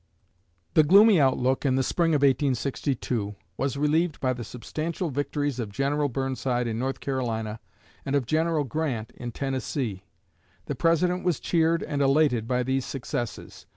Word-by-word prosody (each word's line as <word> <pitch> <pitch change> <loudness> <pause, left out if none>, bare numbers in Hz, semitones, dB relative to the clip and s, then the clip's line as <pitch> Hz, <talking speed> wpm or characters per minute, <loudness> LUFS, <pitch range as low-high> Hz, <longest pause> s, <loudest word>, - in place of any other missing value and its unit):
The - - +7
gloomy 195 +3 +6
outlook 130 -1 +2
in 135 -3 +2
the 130 - +2
Spring 165 +2 +1
of 145 - +1
1862 130 -5 0 0.2
was 135 0 -2
relieved 155 +2 +1
by 130 -1 +1
the 120 -1 -6
substantial 155 +8 -4
victories 145 -1 -2
of 110 -4 -4
General 140 +5 0
Burnside 130 -1 -1
in 115 -1 -2
North 135 +2 -2
Carolina 115 -5 -2 0.4
and 140 - -1
of 140 -3 +1
General 160 +3 +1
Grant 135 -6 -3
in 120 -1 -7
Tennessee. 130 -5 -3 0.6
The - - -3
President 175 +2 +1
was 175 -5 +1
cheered 165 0 +1
and 145 -1 -2
elated 135 -5 +3
by 125 0 +1
these 130 +1 0
successes. 120 -3 -5
135 Hz, 155 wpm, -26 LUFS, 125-155 Hz, 0.6 s, The